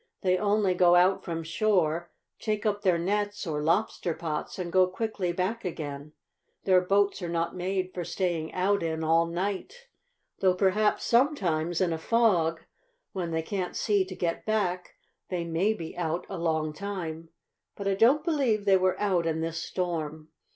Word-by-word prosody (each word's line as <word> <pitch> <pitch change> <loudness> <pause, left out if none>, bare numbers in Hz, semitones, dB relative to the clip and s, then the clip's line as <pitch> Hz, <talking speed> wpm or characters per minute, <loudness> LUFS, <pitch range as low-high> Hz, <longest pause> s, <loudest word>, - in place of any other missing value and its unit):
"They 185 -1 +3
only 205 0 +2
go 175 -1 +5
out 185 +2 +4
from 165 -2 -4
shore, 170 -1 +1 0.3
take 215 -1 -2
up 205 -1 0
their 185 -4 +3
nets 205 +4 -1
or 150 -3 -2
lobster 170 +1 0
pots, 155 -3 -4
and 175 -2 -4
go 185 0 +5
quickly 190 -1 -2
back 185 +6 -2
again. 150 -4 -6 0.5
Their 185 -1 +4
boats 200 +2 +1
are 175 - -3
not 170 +1 -1
made 185 0 -2
for 175 - -3
staying 170 -3 -2
out 200 +2 +1
in 160 -1 -2
all 165 +1 +3
night. 200 - -4 0.5
Though 185 -1 +3
perhaps 205 +3 +2
sometimes, 175 - +1
in 175 -3 +2
a 160 - -3
fog, 175 -7 +2 0.5
when 180 -3 -3
they 160 -1 -1
can't 185 0 -3
see 205 -3 +2
to 185 0 -8
get 170 -2 -2
back, 185 -5 -1 0.3
they 180 -2 -2
may 170 +6 +1
be 170 -7 -6
out 170 -1 -2
a 190 - -6
long 160 -2 0
time. 165 -3 -5 0.5
But 200 - -4
I 195 - +2
don't 245 +10 +4
believe 265 - +1
they 195 -1 +5
were 185 0 +1
out 185 -5 +1
in 160 0 -1
this 165 0 -3
storm." 160 -4 -3
180 Hz, 170 wpm, -28 LUFS, 165-200 Hz, 0.5 s, go